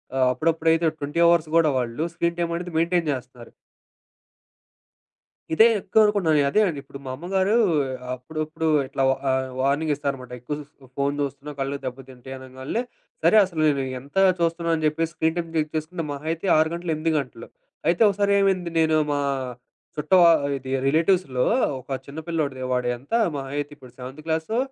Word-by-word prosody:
ఆహ్, 130 -1 +3
అప్పుడప్పుడైతే 160 +3 +2
20 145 +2 -3
అవర్స్ 170 -2 +4
కూడా 160 -2 +4
వాళ్ళు 125 +4 -2
స్క్రీన్ 170 0 -1
టైమ్ 170 -1 0
అనేది 175 +1 -5
మెయింటైన్ 170 0 +1
జేస్తన్నారు. 125 -2 -7 2.0
ఇదే 220 - +7
ఎక్కువ 195 +3 +2
అనుకుంటున్నాను. 185 -8 +2
అదే 210 - +3
అండి. 155 -6 -3
ఇప్పుడు 140 0 -11
మా - - -5
అమ్మగారు 190 +7 0 0.6
అప్పుడుప్పుడు 155 +5 -4 0.2
ఇట్లా 135 0 -2 0.3
ఆహ్, 130 0 0
వార్నింగ్ 140 +4 +1
ఇస్తారనమాట. 135 -3 -4
ఎక్కువ 135 +5 -4 0.4
ఫోను 140 +1 0
జూస్తున్నా 140 +1 -4
కళ్ళు 135 +1 -2
దెబ్బ 130 +1 -5
తింటాయి 130 +1 -10
అనంగాల్నే 130 - -4 0.4
సరే, - - +5
అసలు 170 -4 -4
నేను 140 -2 +1 0.2
ఎంత 140 +6 -17 0.2
చూస్తున్నానని 165 -1 0
జెప్పేసి 160 +2 -1
స్క్రీన్ 160 0 0
టైమ్ 170 -1 -2
చెక్ 155 -1 0
చేసుకుంటే 160 +2 -3
మహ 140 - -5
అయితే 165 +3 -4
6 160 0 +3
గంటలు, 170 0 -3
8 160 +1 -1
గంటలు. 125 -4 -7 0.4
అయితే 170 +4 +2
ఒకసారరేమైంది 200 -3 +2
నేను 160 -1 +3 0.2
మా 145 - 0 0.8
చుట్టవ 155 +5 +3 0.4
ఇది 130 0 -8 0.2
రిలేటివ్స్‌లో 160 -4 +2 0.3
ఒక 130 - -17 0.2
చిన్న 140 +3 -8
పిల్లోడిదే 145 -6 -2
వాడు 125 -1 0
ఎంత 135 - -12 0.2
మహా 135 -1 -5
అయితే 145 0 -3
,ఇప్పుడు 130 -4 -15
సెవెంతు 130 +4 -9
క్లాసో 160 +7 -1
155 Hz, 155 wpm, -24 LUFS, 135-170 Hz, 2.0 s, ఇదే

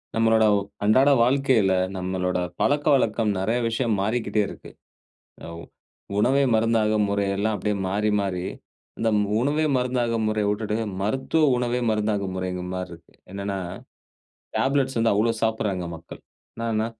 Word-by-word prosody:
நம்மளோட 110 -1 +4 0.4
அன்றாட 130 +7 +5
வாழ்க்கையில, 125 -6 +3 0.2
நம்மளோட 90 0 -2 0.2
பழக்கவழக்கம் 135 -6 +2
நிறைய 110 +6 0
விஷயம் 115 0 0
மாறிக்கிட்டே 110 +1 0
இருக்கு. - - -11 0.7
ஆ - - -7 0.7
உணவே 135 +6 +3
மருந்தாகும் 110 -1 +2
முறை 100 0 0
எல்லாம் 105 +2 0
அப்டியே 105 0 -1
மாறி, 105 +3 0
மாறி. 95 -3 -2 0.6
இந்த 115 - +1 0.3
உணவே 145 +5 +1
மருந்தாகும் 120 -3 0
முறைய 105 -1 0
உட்டுட்டு, 105 0 -2 0.3
மருத்துவ 135 +9 +1
உணவே 125 0 -1
மருந்தாகும் 105 -3 -1
முறைங்கிற 90 -1 -4
மாரி 90 -1 -4
இருக்கு. 85 0 -15 0.2
என்னனா, 100 0 -3 1.0
டேப்லெட்ஸ் 135 -1 +1
வந்து 115 0 +3
அவ்ளோ 110 +3 +2
சாப்பட்றாங்க 105 -5 -1
மக்கள். 80 - -12 0.4
என்னானா, 115 -1 -1
110 Hz, 125 wpm, -24 LUFS, 100-120 Hz, 1.0 s, அன்றாட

